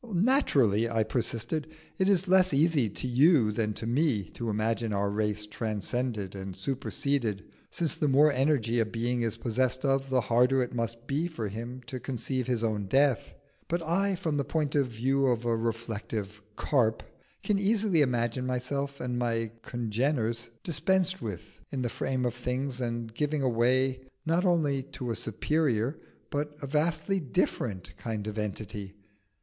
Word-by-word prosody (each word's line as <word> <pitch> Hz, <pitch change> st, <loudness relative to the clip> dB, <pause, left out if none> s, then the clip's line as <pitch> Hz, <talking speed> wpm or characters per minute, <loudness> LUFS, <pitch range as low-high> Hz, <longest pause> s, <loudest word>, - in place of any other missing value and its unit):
"Naturally," 145 Hz, -, +3 dB
I 115 Hz, -1 st, +2 dB
persisted, 120 Hz, +6 st, -1 dB, 0.3 s
"it 190 Hz, +1 st, +3 dB
is 190 Hz, -1 st, +3 dB
less 185 Hz, -4 st, +5 dB
easy 145 Hz, -6 st, +3 dB
to 130 Hz, -, -4 dB
you 130 Hz, -2 st, +5 dB
than 105 Hz, -1 st, -1 dB
to 115 Hz, -, -5 dB
me 125 Hz, -3 st, +2 dB
to 120 Hz, -1 st, -4 dB
imagine 110 Hz, +1 st, 0 dB
our 100 Hz, 0 st, 0 dB
race 105 Hz, 0 st, 0 dB
transcended 110 Hz, -1 st, -2 dB
and 95 Hz, -1 st, -6 dB
superseded, 120 Hz, -1 st, -1 dB, 0.3 s
since 165 Hz, -3 st, -1 dB
the 150 Hz, -, +1 dB
more 145 Hz, +3 st, +6 dB
energy 130 Hz, -4 st, +2 dB
a 115 Hz, -, +3 dB
being 120 Hz, +2 st, -1 dB
is 115 Hz, -1 st, -1 dB
possessed 130 Hz, +3 st, 0 dB
of, 135 Hz, 0 st, +1 dB
the 130 Hz, -1 st, +3 dB
harder 125 Hz, +4 st, +3 dB
it 120 Hz, -, -6 dB
must 115 Hz, 0 st, -3 dB
be 145 Hz, +6 st, 0 dB
for 115 Hz, -11 st, -4 dB
him 120 Hz, +5 st, -6 dB
to 130 Hz, +2 st, -5 dB
conceive 130 Hz, 0 st, -2 dB
his 120 Hz, -3 st, 0 dB
own 105 Hz, -3 st, -1 dB
death. 135 Hz, +2 st, +2 dB, 0.3 s
But 170 Hz, 0 st, -1 dB
I, 190 Hz, +4 st, +1 dB
from 165 Hz, -5 st, -1 dB
the 140 Hz, -, +1 dB
point 150 Hz, -1 st, -1 dB
of 140 Hz, -3 st, +3 dB
view 135 Hz, +4 st, +1 dB
of 120 Hz, -2 st, +1 dB
a 115 Hz, -1 st, +2 dB
reflective 110 Hz, -2 st, -3 dB
carp, 115 Hz, -6 st, +1 dB, 0.4 s
can 205 Hz, -2 st, +2 dB
easily 200 Hz, -4 st, +3 dB
imagine 125 Hz, -1 st, +1 dB
myself 140 Hz, +2 st, -2 dB
and 125 Hz, -1 st, -2 dB
my 115 Hz, -2 st, 0 dB
congeners 120 Hz, 0 st, -1 dB
dispensed 185 Hz, +4 st, +1 dB
with 105 Hz, -6 st, -7 dB
in 130 Hz, -2 st, -2 dB
the 120 Hz, -, 0 dB
frame 130 Hz, +2 st, -1 dB
of 120 Hz, -, 0 dB
things 125 Hz, +1 st, -3 dB
and 115 Hz, -2 st, -3 dB
giving 150 Hz, +2 st, 0 dB
way 130 Hz, +3 st, +2 dB, 0.2 s
not 170 Hz, +4 st, +2 dB
only 155 Hz, -6 st, +2 dB, 0.2 s
to 125 Hz, -4 st, -3 dB
a -, -, -1 dB
superior 130 Hz, +2 st, 0 dB, 0.3 s
but 150 Hz, +1 st, -2 dB
a 140 Hz, -, -5 dB
vastly 160 Hz, +7 st, +1 dB
different 115 Hz, -, -2 dB
kind 110 Hz, -3 st, -4 dB
of 110 Hz, 0 st, -4 dB
Entity. 105 Hz, -1 st, -4 dB
125 Hz, 165 wpm, -29 LUFS, 115-145 Hz, 0.4 s, more